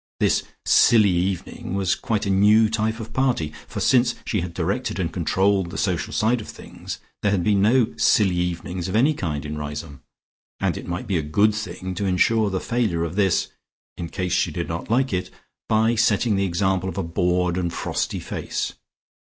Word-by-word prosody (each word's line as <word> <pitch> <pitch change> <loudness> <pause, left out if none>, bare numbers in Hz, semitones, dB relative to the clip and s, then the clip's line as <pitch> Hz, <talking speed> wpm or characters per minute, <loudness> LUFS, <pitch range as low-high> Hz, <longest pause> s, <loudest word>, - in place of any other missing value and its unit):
The - - +3 0.3
"silly 110 -4 +5
evening" 90 +1 -2
was 95 -2 +1
quite 110 -2 -2
a 100 - 0
new 105 +3 +5
type 110 +1 -1
of 110 -1 -8
party, 125 - 0
for - - -6
since 125 -1 +3
she 105 - -1
had 85 0 -4
directed 95 +9 -2
and 85 -3 -2
controlled 95 +1 +1
the 95 - -7
social 90 -5 -1
side 115 +2 +1
of - - -10
things - - -8 0.2
there 105 - +2
had 100 -3 +1
been 100 +1 +2
no 115 +3 +3
"silly 95 -4 +3
evenings" 90 0 -3
of 95 - -3
any 135 +8 +4
kind 75 - -3
in 75 0 -5
Riseholme, 75 -1 -6 0.6
and - - 0
it - - -7
might 90 0 -4
be 95 -4 0
a - - -1
good 100 +9 +2
thing 95 -3 -5
to 100 +1 -2
ensure 105 +4 +2
the 95 -1 -1
failure 110 -9 0
of 85 +1 -4
this 100 -3 +2 0.5
(in 85 - -6
case 90 0 -2
she - - +2
did - - -4
not - - -5
like 130 +1 +1
it) 90 0 -2 0.4
by 110 +1 +3
setting 110 -1 +2
the 100 0 +1
example 95 +1 0
of 90 - -7
a 95 - -1
bored 90 +1 0
and 90 -2 -1
frosty - - -2
face. - - -4
95 Hz, 195 wpm, -23 LUFS, 85-110 Hz, 0.6 s, silly